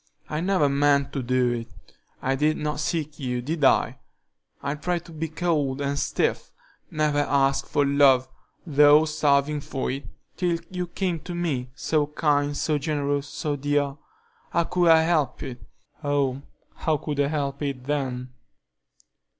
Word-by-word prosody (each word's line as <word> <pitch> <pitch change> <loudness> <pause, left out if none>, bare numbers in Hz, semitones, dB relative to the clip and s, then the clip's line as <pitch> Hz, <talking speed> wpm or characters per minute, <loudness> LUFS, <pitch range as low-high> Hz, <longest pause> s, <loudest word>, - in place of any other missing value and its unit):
I 150 +1 -1
never 185 -5 +2
meant 140 0 +2
to 135 - -2
do 125 0 +1
it. 115 -1 -3 0.6
I 135 - +1
did 150 +3 +1
not 150 -1 -2
seek 155 0 -2
you, 125 -3 -2
did 150 +5 -3
I? 135 - +3 0.6
I 140 0 -2
tried 170 +3 -2
to - - -12
be 160 0 -3
cold 155 -5 -1
and 140 0 -1
stiff; - - -1 0.4
never 150 -1 +1
asked 140 -1 +2
for 145 -1 +1
love, 140 -2 +4 0.4
though 150 0 +6
starving 150 -1 +1
for 140 -3 -3
it, 135 +2 -5 0.3
till 175 -2 +1
you 180 -1 -3
came 175 -1 -2
to 175 +3 -7
me, 145 -8 -2
so 150 0 0
kind, 145 -1 +1
so 150 -2 0
generous, 145 -1 -1
so 150 0 -3
dear,—how 145 +3 -3
could 175 0 +2
I 160 0 +7
help 155 -6 0
it? 125 -2 -7 0.4
Oh, 140 -2 0 0.4
how 155 -2 +1
could 145 0 -4
I 140 - +3
help 140 -1 -2
it 140 -3 -3
then?" 130 -3 -2
145 Hz, 155 wpm, -25 LUFS, 140-155 Hz, 0.6 s, I